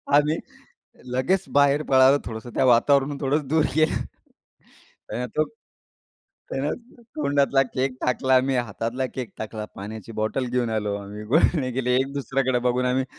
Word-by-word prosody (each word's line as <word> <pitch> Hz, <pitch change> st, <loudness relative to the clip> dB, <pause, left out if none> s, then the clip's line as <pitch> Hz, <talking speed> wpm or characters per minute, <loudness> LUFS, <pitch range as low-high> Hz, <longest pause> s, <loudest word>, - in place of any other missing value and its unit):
आम्ही 150 Hz, +2 st, +3 dB, 0.8 s
लगेच 175 Hz, +10 st, +1 dB
बाहेर 145 Hz, +1 st, +3 dB
पळालो. 135 Hz, 0 st, +5 dB
थोडंसं 110 Hz, +1 st, -7 dB
त्या 135 Hz, -, +3 dB
वातावरणापासून 140 Hz, +3 st, +4 dB
थोडंसं 140 Hz, +1 st, 0 dB
दूर 155 Hz, +2 st, +2 dB
गेलो, 155 Hz, 0 st, +3 dB, 1.1 s
त्यानं 125 Hz, +1 st, -3 dB
तो 155 Hz, -, +5 dB, 1.1 s
त्यानं 140 Hz, +3 st, -1 dB, 0.4 s
तोंडातला 140 Hz, -2 st, +2 dB
केक 130 Hz, 0 st, -2 dB
टाकला, 130 Hz, +1 st, +3 dB
मी 135 Hz, 0 st, -1 dB
हातातला 120 Hz, +3 st, -2 dB
केक 125 Hz, -3 st, -5 dB
टाकला. 110 Hz, 0 st, -5 dB
पाण्याची 110 Hz, +2 st, -8 dB
बॉटल 110 Hz, +4 st, -1 dB
घेऊन 120 Hz, -2 st, 0 dB
आलो. 105 Hz, -2 st, -1 dB
आम्ही 100 Hz, +1 st, -8 dB
गुळणे 140 Hz, +1 st, +2 dB
केले. 125 Hz, 0 st, 0 dB
एक-दुसऱ्याकडे 135 Hz, -1 st, -1 dB
बघून 125 Hz, +1 st, +1 dB
आम्ही 130 Hz, +1 st, +1 dB
130 Hz, 135 wpm, -24 LUFS, 120-140 Hz, 1.1 s, पळालो